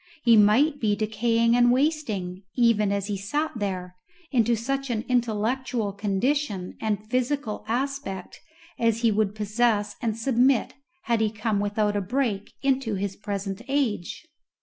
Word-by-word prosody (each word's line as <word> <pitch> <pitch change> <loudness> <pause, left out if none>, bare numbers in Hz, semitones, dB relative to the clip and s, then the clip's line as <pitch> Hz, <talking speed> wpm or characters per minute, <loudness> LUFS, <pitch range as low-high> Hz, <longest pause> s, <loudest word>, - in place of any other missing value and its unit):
He 235 -2 +6
might 245 +9 +4
be 210 -2 +1
decaying 230 +2 +1
and 245 0 +5
wasting, 245 - 0
even 230 -4 +3
as 200 -1 -1
he 205 0 -2
sat 295 +11 -2
there, 185 -3 -4 0.3
into 235 -3 +3
such 275 +4 -2
an 230 -1 -2
intellectual 235 -2 0
condition 200 0 -1
and 215 -1 -2
physical 255 -1 -1
aspect 245 -6 -3 0.4
as 230 -1 +1
he 230 -2 +4
would 210 -1 0
possess 210 0 +1
and 225 -2 -1
submit 250 +1 +2 0.3
had 235 -2 +1
he 220 - +2
come 215 -1 -1
without 205 +1 0
a 205 - +1
break 210 -1 -1
into 265 -5 +1
his 195 0 -3
present 200 -1 -4
age. 270 - -1
220 Hz, 145 wpm, -25 LUFS, 205-250 Hz, 0.4 s, He